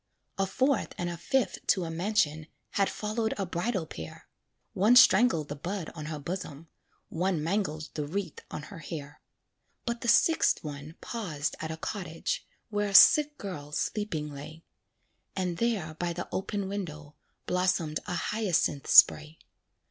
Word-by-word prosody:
A 195 - +2
fourth 260 +5 0
and 175 0 -2
a - - -4
fifth 245 +5 0
to 185 - +3
a 165 - -4
mansion 165 -4 0 0.2
Had 195 -1 +1
followed 220 +1 -2
a 195 - -1
bridal 180 +1 -2
pair; 80 - -9 0.5
One 215 +6 +4
strangled 195 - +6
the 145 - -5
bud 175 +3 -5
on 155 -2 -7
her 155 -1 -4
bosom, 165 -1 -6 0.4
One 175 -2 -1
mangled 160 -3 -1
the 150 -2 -3
wreath 180 -1 -4
on 150 - -6
her 175 - -8
hair. 145 -2 -8 0.6
But 235 0 -3
the 240 - -4
sixth 320 +7 +4
one 145 +1 -7
paused 160 -11 -3
at 160 - -4
a 160 - -5
cottage, 165 -2 -4 0.2
Where 205 0 0
a 195 - -3
sick 300 +7 +8
girl 150 -7 -7
sleeping 155 -7 -2
lay; 155 +3 -10 0.7
And 180 -3 -2
there 205 -9 -1
by 170 +2 -3
the 175 - -5
open 200 +1 -2
window, 155 -7 -6 0.3
Blossomed 180 -4 0
a 180 - -2
hyacinth 180 -7 0
spray. 155 +1 +6
175 Hz, 155 wpm, -29 LUFS, 155-205 Hz, 0.7 s, sick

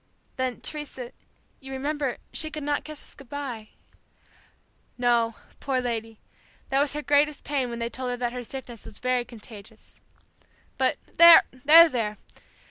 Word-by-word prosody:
"Then, 260 -1 -3
Teresa, 280 -5 -5 0.5
you 270 0 -9
remember, 280 0 -2 0.2
she 315 - +1
could 305 -1 -6
not 290 0 -1
kiss 305 -1 -6
us - - -7
goodbye." 265 -5 -7 1.3
"No, 235 -2 +2 0.2
poor 270 -2 -1
lady, 225 -3 -4 0.5
that 270 - +2
was 285 0 +1
her 300 0 -4
greatest 290 +1 +2
pain 275 -4 -1
when 235 - -5
they 235 0 -2
told 255 +1 -4
her 245 - -2
that 240 -1 -2
her 250 0 -5
sickness 240 -2 -8
was 210 - -10
very 250 -1 0
contagious. 220 -2 -13 0.8
But - - +2 0.2
there! 335 -1 +10
there! 260 -6 +5
255 Hz, 145 wpm, -26 LUFS, 235-290 Hz, 1.3 s, there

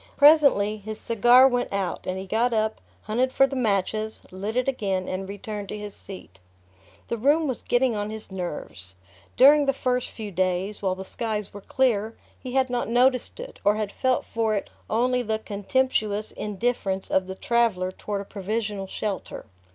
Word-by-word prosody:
Presently 280 -9 +6
his 215 +1 -7
cigar 240 +3 +6
went 245 -2 -1
out, 195 -2 -3
and 185 - -2
he 190 - -5
got 230 +5 +1
up, 220 0 0 0.2
hunted 250 +4 0
for 270 - +5
the 270 - -5
matches, 215 -2 -1
lit 200 +4 -4
it 250 +1 +1
again 195 -8 -1
and 190 +1 -4
returned 205 -1 -6
to 210 - -4
his 210 -1 -7
seat. 185 - -11 0.7
The 235 - -3
room 295 +6 +3
was 260 - -3
getting 245 -1 +1
on 205 0 -2
his 220 -2 -7
nerves. 150 - -6 0.4
During 285 +2 +7
the 275 - +3
first 250 -2 -1
few 215 -3 -7
days, 185 +2 -1
while 190 -2 0
the 190 0 -7
skies 215 -1 -3
were 205 - -9
clear, 225 -3 0 0.2
he 255 -2 -7
had 265 -1 +3
not 245 -2 -2
noticed 250 - +2
it, - - -9
or 205 +1 +4
had 215 -2 -2
felt 260 +2 0
for 225 -2 0
it 200 - -4 0.2
only 250 +3 +2
the 220 -2 -1
contemptuous 215 0 -1
indifference 205 -2 -2
of 185 -1 +2
the 190 - -5
traveller 210 -5 +1
toward 200 +1 -4
a - - -8
provisional 205 0 -3
shelter. 200 0 -4
215 Hz, 180 wpm, -25 LUFS, 195-250 Hz, 0.7 s, During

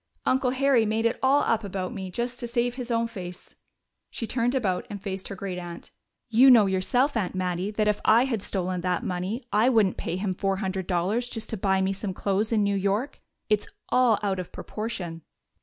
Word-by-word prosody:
"Uncle 255 0 +2
Harry 265 -2 +3
made 220 +1 0
it 230 - +1
all 275 +2 +4
up 225 -1 +1
about 190 -2 -4
me 190 -1 -5
just 240 +5 -3
to 240 - -4
save 240 0 0
his 250 -1 -6
own 230 -1 +1
face." 180 -6 -8 0.6
She 230 - -4
turned 245 +2 0
about 195 -8 0
and 205 - -6
faced 195 -1 -5
her 200 - -6
great 185 -2 -4
aunt. 175 -1 -9 0.4
"You 240 +4 +6
know 230 -5 +8
yourself, 245 +9 +1
Aunt 195 -5 -1
Mattie, 185 +1 -1
that 210 0 0
if 210 -1 +1
I 230 +4 +5
had 235 -6 -2
stolen 185 -2 -2
that 180 0 -1
money 185 +7 -3
I 215 +5 +4
wouldn't 220 -7 +3
pay - - -3
him 190 0 -1
four 195 +1 0
hundred 190 -1 -3
dollars 200 +7 0
just 225 -2 -6
to - - -1
buy 190 0 +2
me 190 +1 +1
some 195 -1 -4
clothes 200 +3 0
in 215 -2 +3
New 200 0 +1
York. 200 +8 -1 0.3
It's 210 -2 +1 0.2
all 250 -4 +4
out 195 -2 0
of 180 - -6
proportion." 185 -7 -5
205 Hz, 210 wpm, -26 LUFS, 190-235 Hz, 0.6 s, know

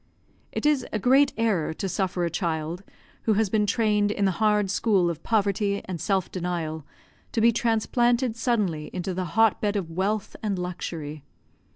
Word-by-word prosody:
It - - -3
is 295 -4 +3
a - - 0
great 265 +6 +4
error 200 -9 0
to 195 - -3
suffer 185 -1 -1
a 170 - -2
child, 165 0 -2 0.4
who 220 - +4
has 210 -1 +1
been 210 -2 +2
trained 210 -1 +2
in 205 -1 0
the 190 - +3
hard 210 -2 +3
school 195 -6 +2
of 165 -1 -8
poverty 200 -2 0
and 175 -4 -5
self 190 -3 0
denial, 170 -4 -3 0.5
to - - +1
be 230 +1 +5
transplanted 240 +1 +1
suddenly 210 -10 -1
into 185 +1 -3
the 185 +1 -2
hot 225 -2 +4
bed 210 -1 0
of 180 -5 -2
wealth 195 +4 -1
and 205 -3 -1
luxury. 165 -4 -5
200 Hz, 175 wpm, -25 LUFS, 175-220 Hz, 0.5 s, be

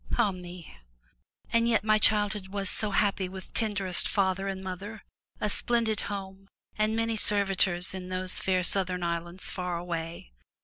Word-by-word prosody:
Ah 205 - +2
me! 180 - -10 0.8
And 230 0 +3
yet 225 -3 +2
my 215 0 +3
childhood 210 -2 +2
was 195 0 -2
so 215 - -1
happy 195 -2 0
with 190 0 -10
tenderest 200 -5 +2
father 195 0 0
and 190 -1 -5
mother, 195 +4 -7 0.4
a - - -1
splendid 225 0 0
home 195 -1 -7 0.3
and 215 +1 0
many 225 0 -1
servitors 195 -4 +3
in 185 -1 -7
those 185 0 -2
fair 185 -1 0
southern 180 -1 +4
islands 170 +2 -4
far 180 -1 -3
away. 165 - -6
195 Hz, 150 wpm, -28 LUFS, 180-210 Hz, 0.8 s, southern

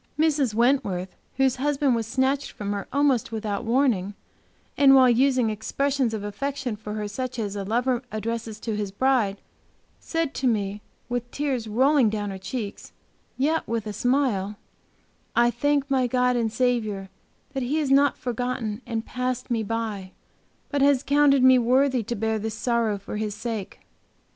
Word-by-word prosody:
Mrs. 295 -7 +2
Wentworth, 210 -7 +1 0.2
whose 265 -1 +2
husband 280 0 +1
was 225 -2 -1
snatched 265 +3 0
from 205 -1 -4
her 200 -1 -4
almost 275 -5 +2
without 215 0 -3
warning, 225 -6 +1 0.6
and 275 -1 +6
while 260 -1 +7
using 250 -1 +3
expressions 265 +4 -1
of 210 - -5
affection 255 +3 -3
for 210 0 -7
her 210 -1 -3
such 255 +4 -4
as 205 -3 -3
a 200 - -3
lover 240 +4 0
addresses 220 0 -4
to 225 -2 -2
his 205 -2 -3
bride, 215 -3 +1 0.6
said 330 -3 -2
to 260 - -1
me, 205 -3 -1 0.3
with 245 0 -3
tears 265 -6 -2
rolling 260 +2 +3
down 205 -1 -3
her 190 - -7
cheeks, 200 +2 -6 0.4
yet 310 +5 +1
with 230 -1 -2
a 210 - -4
smile, 240 -6 0 0.8
'I 240 0 +4
thank 285 +3 +1
my 260 -2 +3
God 250 0 +2
and 230 -2 0
Saviour 220 -6 -1 0.4
that 270 - -2
He 265 +5 -1
has 295 -4 0
not 280 0 +4
forgotten 245 -2 -3
and 225 -2 -3
passed 255 0 -3
me 230 -2 +1
by, 215 -3 -4 0.6
but 285 -1 -1
has 280 -1 +4
counted 280 -2 +4
me 260 0 +7
worthy 255 +1 +3
to 230 +2 -4
bear 220 0 -1
this 220 +1 -4
sorrow 230 -2 0
for 200 +2 -7
His 210 -1 -3
sake.' 220 -3 -5
240 Hz, 165 wpm, -25 LUFS, 215-265 Hz, 0.8 s, while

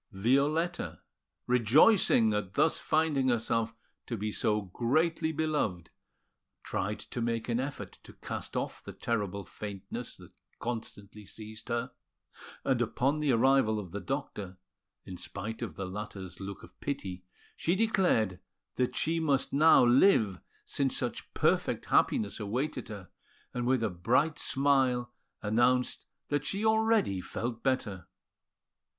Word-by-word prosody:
Violetta, 140 - +1 0.5
rejoicing 125 - +5
at 100 -3 -3
thus 160 - +3
finding 155 -4 +1
herself 115 -1 0 0.3
to 115 - -3
be 105 +1 -2
so 105 0 +1
greatly 155 - +1
beloved, 150 - -1 0.7
tried 105 +3 -2
to 120 - -6
make 115 -1 -1
an 120 0 0
effort 140 +2 -5
to - - -14
cast - - -6
off - - -4
the - - -8
terrible 100 -4 -2
faintness 100 -2 -7
that - - -14 0.3
constantly 105 -3 -6
seized 110 +3 -10
her; 120 0 -1 0.7
and 130 -3 +1
upon 135 +5 +1
the 150 -2 +2
arrival 120 -2 +4
of 95 -5 -8
the 100 - -4
doctor, 105 -8 -4 0.5
in 90 - -7
spite 105 +6 -6
of 105 -10 -4
the 95 - -4
latter's 95 -1 -7
look 100 0 -7
of - - -16
pity, 95 -10 -4 0.3
she 170 - 0
declared 180 - +2 0.4
that 125 0 0
she 165 +1 +1
must 140 -4 +1
now 150 -2 +7
live 120 - +4 0.3
since 135 -2 0
such 120 -2 -4
perfect - - +1
happiness 100 -1 +2
awaited 120 +9 -2
her, 100 -4 -9 0.4
and 120 0 -2
with 130 -2 +2
a 110 - +1
bright 125 - +1
smile 130 -3 +2 0.3
announced 120 +4 +2 0.2
that 145 -1 0
she 200 +7 -2
already 220 - +3
felt 115 +4 -4
better. 105 -9 -1
120 Hz, 135 wpm, -30 LUFS, 105-140 Hz, 0.7 s, now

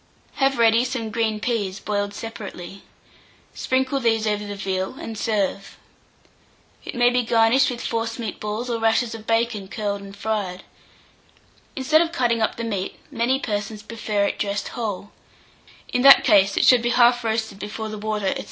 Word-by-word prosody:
Have 270 -1 +2
ready 230 0 +4
some 250 -4 -3
green 220 -1 0
peas, 210 -4 -2
boiled 205 -1 -2
separately; 200 -4 -8 0.7
sprinkle 265 +1 0
these 225 -3 +1
over 210 -1 0
the 205 0 -6
veal, 190 +1 -3
and 225 - -7
serve. 205 -2 -2 1.1
It - - -7
may 245 0 +4
be 250 0 +2
garnished 230 +3 +3
with 245 -2 -5
forcemeat 230 0 -3
balls, 215 +3 -4
or 235 -2 -2
rashers 225 +1 +1
of 220 -1 -10
bacon 225 -3 0
curled 200 0 -3
and 200 0 -11
fried. 200 -4 -3 1.1
Instead 305 +4 +3
of 335 -1 0
cutting 240 -7 +1
up 220 - +1
the 230 - -5
meat, 200 -4 -3
many 250 0 +1
persons 210 -2 -4
prefer 215 -2 -2
it - - -3
dressed 200 -1 -2
whole; 205 -4 -5 0.8
in 250 - +2
that 275 +1 +9
case 195 -1 +4
it - - +4
should 250 -2 +6
be 240 - 0
half 240 0 +4
roasted 220 -2 -2
before 215 +1 -5
the 215 -1 -6
water, 210 -2 -1
&c. - - -4
225 Hz, 170 wpm, -23 LUFS, 205-240 Hz, 1.1 s, that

